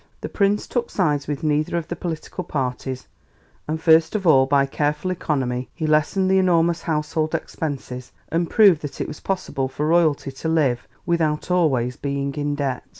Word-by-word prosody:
The - - -5
Prince 200 0 +1
took 240 -1 -2
sides 150 -7 0
with 145 +1 -4
neither 155 +2 +1
of 165 - -3
the 175 - -4
political 170 +2 -5
parties, 130 -4 -4 0.6
and 155 +1 -2
first 160 +3 +4
of 200 -3 -1
all 135 -5 +5
by 140 0 +3
careful 150 +5 -1
economy 130 -7 -2
he 160 - -3
lessened 155 +5 +2
the 190 0 +4
enormous 170 -2 +2
household 155 0 -1
expenses 130 -5 -5 0.2
and 165 0 0
proved 195 -8 +5
that 145 - -7
it - - -2
was 150 - -8
possible 180 -8 -2
for 145 +3 -3
royalty 155 -4 +2
to 135 +4 -6
live 140 -7 +1 0.2
without 165 -1 0
always 130 -9 +1
being 140 0 -2
in 145 0 -2
debt. 140 -3 -2
155 Hz, 175 wpm, -22 LUFS, 140-170 Hz, 0.6 s, all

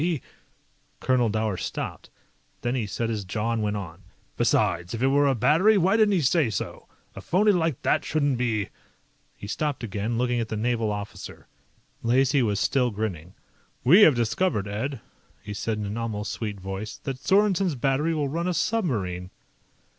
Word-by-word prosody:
He 165 -2 0 0.4
" - - -40
Colonel 125 -3 +2
Dower 110 -2 -1
stopped. - - -5 0.5
Then 120 - -1
he 120 -5 -1
set 115 +4 -2
his 105 -3 -3
jaw 105 +4 -2
and 115 -1 -1
went 105 0 -1
on. 90 -2 -8 0.3
"Besides, 85 +5 +1
if 115 - -3
it 135 - +4
were 140 +1 +4
a 135 - +2
battery, 170 - +4
why 190 +3 +3
didn't 215 -2 +4
he 180 - +2
say 150 -1 +3
so? 100 - -5 0.3
A - - -7
phony 210 +4 +3
like 165 -7 0
that - - +2
shouldn't 145 -5 0
be 110 -5 0 0.3
" - - -40
He - - -9
stopped 145 +6 -2
again, 110 +2 -2
looking 125 0 +1
at 115 -1 -3
the 110 - -3
naval 115 -1 0
officer. 105 0 -7 0.6
Lacey 130 +3 +3
was 105 -4 +1
still 125 0 +2
grinning. 95 -6 -5 0.5
"We 170 - +7
have 155 -9 +7
discovered, 115 - 0
Ed," 115 +5 -3 0.4
he 105 -2 -7
said 110 +2 -2
in 105 - -3
an 100 +2 -4
almost 110 -2 -3
sweet 105 -3 -4
voice, 95 +3 -6
"that 135 -2 -5
Sorensen's 195 -1 +2
battery 140 +5 +1
will 150 -2 0
run 165 +5 -2
a 180 - 0
submarine." 110 - -1
120 Hz, 185 wpm, -25 LUFS, 105-150 Hz, 0.6 s, We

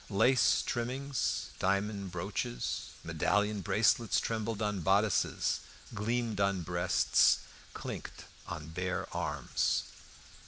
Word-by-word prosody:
Lace 115 +6 +4
trimmings, 130 +3 -2
diamond 100 0 0
brooches, 90 -9 -3
medallion 95 +6 +1
bracelets 110 +3 +3
trembled 110 -1 -2
on 105 -3 -1
bodices, 100 +4 +2 0.3
gleamed 115 0 -1
on 100 -2 +1
breasts, 90 +1 +3 0.4
clinked - - -6 0.2
on 80 -2 -6
bare 90 +3 -2
arms. - - 0
100 Hz, 90 wpm, -32 LUFS, 90-110 Hz, 0.4 s, Lace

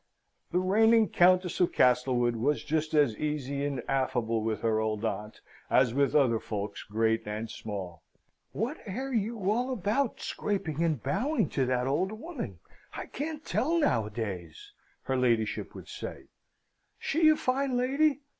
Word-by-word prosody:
The 175 - +1
reigning 220 +3 +4
Countess 180 +1 +3
of 180 - +3
Castlewood 125 -1 +3
was 140 +6 0
just 155 0 -1
as 145 -7 +4
easy 140 -2 -2
and 140 -3 -2
affable 120 -4 0
with 110 0 -2
her 110 -1 +1
old 110 0 -1
aunt, 105 0 -4 0.3
as 125 -2 +4
with 140 0 +2
other 125 -6 +4
folks 100 -2 -5
great 110 +2 0
and 110 +2 -4
small. 95 -6 -6 0.5
"What 240 - -3
air 260 +7 -4
you 220 -3 -1
all 245 +4 0
about, 225 +3 0
scraping 190 -7 -2
and 155 -7 0
bowing 270 - 0
to 130 -3 0
that 125 -1 +1
old 160 +9 0
woman, 230 - -6 0.4
I - - -5
can't 305 +1 -5
tell, 325 +6 +1
noways!" 105 - -2 0.3
her 135 - -1
ladyship 115 -4 0
would - - -10
say. - - -8 0.7
"She 315 +1 +3
a 310 - +6
fine 260 -1 0
lady! 280 +3 +2
145 Hz, 150 wpm, -29 LUFS, -, 0.7 s, a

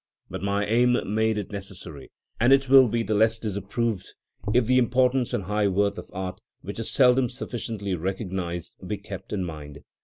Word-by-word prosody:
But - - -5
my 100 +1 0
aim 120 +3 +3 0.2
made 110 0 +1
it 105 -1 -4
necessary, 95 -7 -7 0.3
and 120 +3 +4
it 135 0 +5
will 135 -1 +8
be 115 +1 0
the 110 - -1
less 110 +2 +3
disapproved 105 0 -3 0.4
if 120 +1 +3
the 130 +2 +4
importance 125 0 +2
and 100 - -1
high 105 +2 +1
worth 100 +1 +1
of - - -11
art, 95 +1 -5 0.2
which 100 +3 -6
is 115 - -1
seldom 125 -1 +4
sufficiently 110 -5 -4
recognised, 90 -1 -4
be 105 - -2
kept 100 -1 -9
in 100 -3 -1
mind. 75 -3 -8
105 Hz, 180 wpm, -25 LUFS, 95-120 Hz, 0.4 s, will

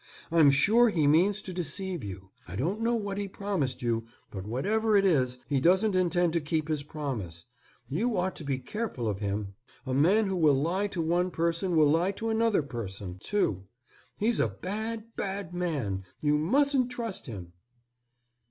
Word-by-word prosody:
I'm 160 -4 +6
sure 215 - +5
he 160 -8 +1
means 185 +8 +3
to 185 - -5
deceive 180 -1 -2
you. 95 -1 -8 0.2
I 90 - -7
don't 175 - -1
know 235 +1 +2
what 205 -3 -3
he 200 - -2
promised 190 -11 -2
you, 115 -1 -1 0.2
but 95 0 -6
whatever 210 - +1
it 200 - +3
is, 130 -8 +2
he 140 -2 +1
doesn't 185 +7 +3
intend 175 -2 +2
to 170 - +1
keep 155 +1 -1
his 155 -2 0
promise. 125 - -5 0.4
You 215 - 0
ought 185 0 0
to - - -4
be 140 -2 -1
careful 135 - -4
of 100 -2 -2
him. 100 -1 -3 0.3
A 130 - -2
man 185 +11 +4
who 190 -1 -1
will 150 -5 +4
lie 180 +7 0
to 180 -4 -2
one 175 +3 +1
person 170 +1 0
will 150 -2 +5
lie 175 +5 +2
to 225 +3 -3
another 220 -6 +2
person, 100 -8 -6
too. 100 - -1 0.5
He's 225 +2 +1
a - - +3
bad, 215 - -4
bad 195 -3 -4
man. 140 - -2 0.2
You 150 0 +2
mustn't 265 - +3
trust 230 -5 -4
him." 90 -7 -8
170 Hz, 180 wpm, -28 LUFS, 130-200 Hz, 0.5 s, I'm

